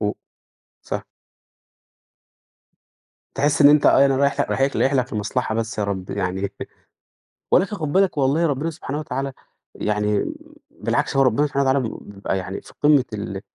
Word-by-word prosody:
و 105 -1 0 0.7
صح. - - -4 2.3
تحِس 145 +2 +2
إن 145 - +9
أنت 150 0 +5
أَي 135 - +6
أنا 135 -1 +2
رايح 140 +1 +2
ل - - 0
رايح - - -1
لك 135 +1 +1
رايح 135 - +2
لك 130 0 0
لمصلحة 105 +1 -2
بس 115 -1 -3
يا 105 - 0
رب 100 -2 -4
يعني 95 0 -2 1.0
ولكن 195 +2 +3
خُد 155 -5 -3
بالك 190 -4 +2
والله 140 +5 +2
ربِّنا 145 +2 -1
سبحانه 150 -3 -5
وتعالى 135 -2 -3 0.4
يعني 105 -1 0 0.5
بالعكس - - -1
هو 135 - +5
ربِّنا 130 +3 +3
سبحانه 140 -1 0
وتعالى 130 -4 +1
ب - - -7 0.2
بيبقى 100 -1 -2
يعني 95 +1 -5
في - - -16
قِمّة 145 -3 +5
ال 100 -2 -5
135 Hz, 165 wpm, -22 LUFS, 105-145 Hz, 2.3 s, إن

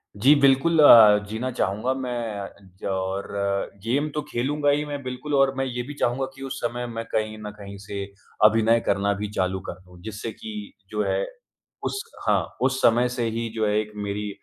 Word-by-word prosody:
जी, 125 +9 +6
बिल्कुल 140 +4 +4
अ, 110 -7 +9
जीना 115 +4 -3
चाहूँगा 115 +2 -1
मैं 115 -6 -5 0.2
ज - - -7
और 95 +1 -2 0.6
गेम 135 +7 0
तो 150 - 0
खेलूँगा 145 +4 0
ही 145 +1 +2
मैं 145 -1 -5
बिल्कुल 130 +4 -5
और 135 -1 +4
मैं 135 - 0
ये 125 -1 -3
भी 145 - -6
चाहूँगा 125 +3 +1
कि 135 - -13
उस 135 0 -5
समय 120 +1 -2
मैं 115 -1 -5
कहीं 110 0 -1
न 105 - -5
कहीं 100 -1 -9
से 100 -1 -4 0.4
अभिनय 115 +2 +5
करना 100 +1 +1
भी 105 +1 -4
चालू 95 0 0
कर 90 - -7
दूँ। 90 -1 -16
जिससे 110 +1 -5
कि 220 +3 -8 0.2
जो - - -1
है - - +1 0.6
उस 400 - -2 0.3
हाँ, - - +1
उस 130 0 +1
समय 120 +2 +4
से 120 -1 -2
ही 115 +1 -3
जो 110 -1 +1
है 105 - +1
एक 105 0 -4
मेरी 105 0 -3
115 Hz, 195 wpm, -24 LUFS, 105-135 Hz, 0.6 s, अ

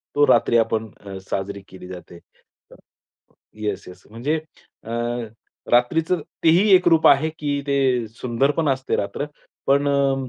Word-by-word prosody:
तो 145 0 +5
रात्री 120 - +4
आपण 110 -1 0
अ, 100 -1 -9
साजरी 100 +1 -3
केली 90 -1 -11
जाते. 90 -1 -10 1.4
Yes, 100 -2 -3
yes. 90 0 -13
म्हणजे 140 +8 -1 0.4
अ, 115 - -11 0.8
रात्रीचं 160 +8 +2 0.2
तेही 175 +6 +5
एक 180 - +3
रूप 160 -1 +5
आहे, 145 +3 +5
की 145 -1 -1
ते 130 -4 +1
सुंदर 120 +4 0
पण 160 -3 +1
असते 130 0 -1
रात्र. 100 +8 -3 0.4
पण 140 +1 +3
अ, 140 -1 +2
135 Hz, 140 wpm, -22 LUFS, 110-145 Hz, 1.4 s, तो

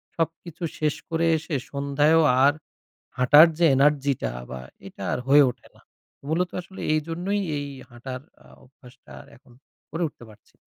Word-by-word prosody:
সবকিছু 165 +1 -4 0.2
শেষ 150 -1 0
করে 165 0 0
এসে 155 -1 -5 0.2
সন্ধ্যায়ও 145 +3 +2 0.2
আর 145 +1 +5 0.7
হাঁটার 145 +6 +8
যে 170 - +3
এনার্জি 140 0 +3
টা - - -2 0.2
বা 65 0 -6 0.3
এটা - - -12
আর - - -1
হয়ে 145 0 +7
ওঠে 120 0 -15
না। - - -21 0.5
মূলত 175 +3 0
আসলে 190 +2 -12
এইজন্যই 170 +6 -2 0.2
এই 145 - -4 0.2
হাঁটার 125 +2 -8 0.2
আ - - -19 0.2
অভ্যাসটা 125 0 -17 0.2
এখন 125 -1 -22 0.4
করে 165 +3 -3
উঠতে 120 - -16
পারছি। 105 - -21
145 Hz, 150 wpm, -24 LUFS, 135-165 Hz, 0.7 s, হাঁটার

